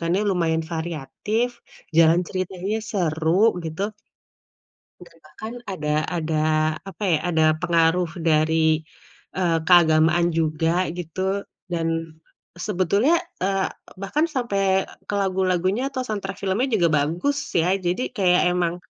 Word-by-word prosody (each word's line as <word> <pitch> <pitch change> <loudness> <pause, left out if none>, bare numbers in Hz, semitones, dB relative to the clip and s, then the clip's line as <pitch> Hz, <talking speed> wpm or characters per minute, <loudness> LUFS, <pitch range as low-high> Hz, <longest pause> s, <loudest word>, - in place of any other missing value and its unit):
kan 165 0 -2
ya, - - +1
lumayan 165 -3 +1
variatif, 170 - -2 0.5
jalan 165 +1 +6
ceritanya 185 +2 -3
seru, 160 -5 0 0.3
gitu. 160 +4 -4 1.2
Dan 165 - -20
bahkan 215 +10 -9 0.2
ada 150 -5 -4 0.3
ada 160 -1 -2 0.5
apa 195 +1 -8
ya, 160 - +4
ada 160 -2 +2 0.2
pengaruh 170 0 +2
dari, 160 0 +2 0.5
eee, 170 -3 +2
keagamaan 170 -1 +5
juga, 165 +2 0
gitu. 190 +4 -3 0.2
Dan 165 -1 -1 0.8
sebetulnya 205 - +2 0.2
eee, 195 0 0 0.3
bahkan 295 +11 +1
sampe 200 - 0 0.2
ke 205 - -2
lagu-lagunya 190 +4 0
atau 260 -2 -3
soundtrack 200 -4 -4
filmnya 200 +7 0
juga 175 -5 +3
bagus, 175 - 0 0.2
ya? 170 +2 +3
Jadi 185 +9 -1
kayak 180 -2 +4
emang 175 -1 0
180 Hz, 115 wpm, -23 LUFS, 165-195 Hz, 1.2 s, jalan